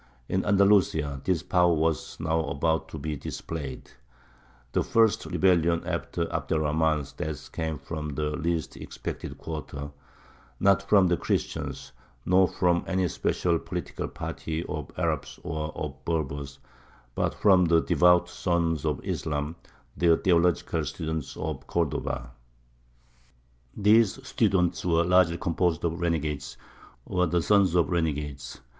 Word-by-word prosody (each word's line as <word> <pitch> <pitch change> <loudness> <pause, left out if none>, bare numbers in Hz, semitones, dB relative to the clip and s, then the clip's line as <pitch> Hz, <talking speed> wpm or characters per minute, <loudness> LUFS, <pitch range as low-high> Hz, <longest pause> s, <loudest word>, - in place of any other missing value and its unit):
In 95 - 0
Andalusia 95 -9 +3
this 90 -3 0
power 90 -1 +3
was 80 0 -1
now 80 0 0
about 80 +3 0
to 80 - -7
be 75 +1 -3
displayed. 70 -2 -6 0.8
The - - +1
first 115 -2 +2
rebellion 85 -3 +2
after - - -2
Abd - - -1
er - - +2
Rahmān's 75 -2 0
death 75 +1 -6
came 80 -2 -3
from 75 -1 -5
the 75 +1 -1
least 80 +1 -2
expected - - -7
quarter; 75 -2 -6 0.7
not 100 0 +4
from 100 -1 +4
the 85 -1 +2
Christians, - - -3 0.3
nor 95 +1 +5
from 90 -1 +1
any 95 -1 +1
special 85 +1 0
political - - -5
party 80 +1 -5
of 75 -2 -5
Arabs - - -2
or 80 -3 -3
of 70 -3 -6
Berbers, 70 -4 -3 0.6
but - - -1
from 95 -3 +5
the 85 -1 +4
devout 90 +1 +4
sons 85 -3 -1
of 75 -3 -2
Islam, 75 0 -2 0.4
the 85 -2 +4
theological 85 -3 +2
students 80 -1 -4
of 75 -3 -5
Cordova. - - -2 1.5
These 105 +1 +4
students 100 -9 +1
were 85 -1 +3
largely 90 -1 +4
composed 85 -1 0
of 85 +1 -2
renegades, 75 -5 -2 0.5
or 90 -2 +1
the 85 -1 +1
sons 100 -3 +4
of 85 +1 +3
renegades. 75 -5 -2
80 Hz, 130 wpm, -27 LUFS, 75-90 Hz, 1.5 s, nor